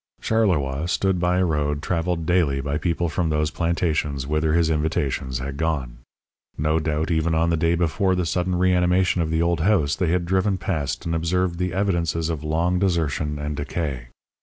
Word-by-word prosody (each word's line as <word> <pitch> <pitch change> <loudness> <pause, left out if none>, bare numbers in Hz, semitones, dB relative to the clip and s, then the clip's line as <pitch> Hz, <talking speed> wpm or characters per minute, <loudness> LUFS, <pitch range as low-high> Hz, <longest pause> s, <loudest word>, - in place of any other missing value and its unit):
Charleroi 85 -10 +1
stood 95 +1 +1
by 90 +1 +1
a 95 - +3
road 75 -2 -1
travelled 85 0 -1
daily 80 -6 +2
by 70 +2 -2
people 85 +2 0
from 85 0 -1
those 75 0 0
plantations 80 -5 -1
whither 75 +2 0
his 85 -1 +2
invitations 70 -4 -1
had 70 +2 -5
gone. 70 -7 -2 0.6
No 75 +2 +1
doubt 80 +1 -1
even 80 0 +1
on 85 +1 +2
the - - +2
day 85 +1 +2
before 90 +3 +1
the 90 -1 0
sudden 90 +2 0
reanimation 90 0 +2
of 80 - -1
the 80 +1 +1
old 85 -1 +1
house 80 -4 +2
they 90 - 0
had 85 0 +1
driven 95 +2 +1
past 80 -7 -3
and 85 - -1
observed 85 +1 0
the 90 0 -1
evidences 85 -4 0
of 80 -2 -4
long 85 +4 0
desertion 80 -5 0
and 75 0 -4
decay. 70 -4 -4
80 Hz, 185 wpm, -23 LUFS, 75-90 Hz, 0.6 s, a